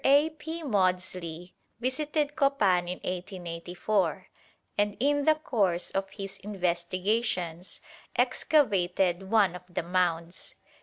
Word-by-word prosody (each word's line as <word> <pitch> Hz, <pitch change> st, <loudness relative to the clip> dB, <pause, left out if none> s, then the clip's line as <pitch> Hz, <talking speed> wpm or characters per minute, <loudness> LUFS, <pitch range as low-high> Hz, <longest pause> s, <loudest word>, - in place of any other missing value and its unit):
A. 285 Hz, +4 st, +5 dB
P. 320 Hz, +2 st, -6 dB
Maudslay 185 Hz, -, -1 dB, 0.3 s
visited 295 Hz, +4 st, -1 dB
Copan 205 Hz, -, +3 dB
in 180 Hz, -, -3 dB
1884, 180 Hz, 0 st, -2 dB, 0.5 s
and 205 Hz, 0 st, +1 dB
in 285 Hz, +2 st, +2 dB
the 310 Hz, -, +6 dB
course 200 Hz, -, 0 dB
of 195 Hz, 0 st, -2 dB
his 195 Hz, -1 st, -7 dB
investigations 185 Hz, -1 st, -1 dB, 0.3 s
excavated 195 Hz, -, +2 dB
one 205 Hz, -5 st, +4 dB
of 180 Hz, -, -7 dB
the 170 Hz, -, -2 dB
mounds. 175 Hz, -1 st, -1 dB
195 Hz, 105 wpm, -29 LUFS, 180-255 Hz, 0.5 s, the